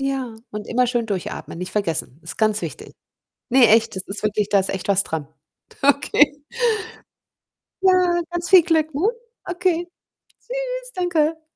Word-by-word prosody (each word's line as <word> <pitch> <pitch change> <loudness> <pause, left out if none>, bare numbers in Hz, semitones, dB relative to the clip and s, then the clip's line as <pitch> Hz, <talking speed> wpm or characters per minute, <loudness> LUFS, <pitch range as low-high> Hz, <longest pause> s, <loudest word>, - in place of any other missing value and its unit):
Ja, 270 -4 -2 0.2
und 210 0 -6
immer 250 +1 +2
schön 240 -2 -1
durchatmen, 190 -4 -5
nicht 180 +1 -5
vergessen. 165 -7 -2
Ist 165 - -7
ganz 215 -1 +2
wichtig. - - -7 0.6
Ne, 250 -2 +6
echt, 225 -1 +4
das 190 - -3
ist 205 +2 -5
wirklich 210 -1 0
da 200 - +4
ist 190 - -1
echt 190 - -4
was 195 -1 +4
dran. 155 -3 -4 0.5
Okay. 285 +1 +3 1.4
Ja, 365 -2 +3
ganz 345 -1 -3
viel 370 -3 +8
Glück, 315 -3 +1
ne? 335 +9 +2 0.4
Okay. 355 -1 -1 0.5
Tschüss, - - -4
danke. 325 -3 0
270 Hz, 150 wpm, -22 LUFS, 210-345 Hz, 1.4 s, viel